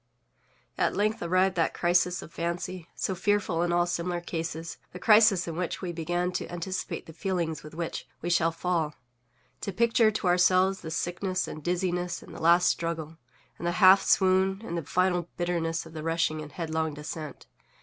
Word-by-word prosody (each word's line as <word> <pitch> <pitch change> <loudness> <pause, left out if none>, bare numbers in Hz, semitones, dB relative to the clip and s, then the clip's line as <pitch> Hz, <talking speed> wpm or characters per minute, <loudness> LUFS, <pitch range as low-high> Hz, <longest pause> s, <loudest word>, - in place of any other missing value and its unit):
At - - +2
length 215 +2 0
arrived 185 +2 +2
that 165 - +1
crisis 180 +1 +2
of 165 - -13
fancy, 170 +1 -4
so 190 - -1
fearful 190 -2 0
in 175 0 +1
all 175 0 +3
similar 175 0 -2
cases, 165 -1 -5 0.2
the - - -6
crisis 210 -4 +5
in 165 - -4
which 180 0 -3
we 180 - -2
began 175 +2 -1
to - - -4
anticipate 175 +2 -4
the 160 - -11
feelings 170 -3 -2
with 155 0 -11
which 170 -1 -4
we 175 - -4
_shall_fall—to 160 - -2
picture 230 +2 +3
to 215 -1 -3
ourselves 185 +2 +3
the 160 - -6
sickness, 180 +3 -2
and 155 - -7
dizziness, 180 0 -1
and - - -12
the - - -9
last 170 +2 +5
struggle, 165 -1 -2 0.4
and 175 - -3
the 175 - +1
half 190 +2 +7
swoon, 190 +1 +3
and 170 - -4
the 170 - -1
final 180 +1 +1
bitterness 170 -2 -1
of 160 - -12
the 155 - -6
rushing 160 -1 0
and 150 -1 -10
headlong 160 -2 -2
descent. 150 +1 -7
175 Hz, 175 wpm, -28 LUFS, 165-185 Hz, 0.4 s, half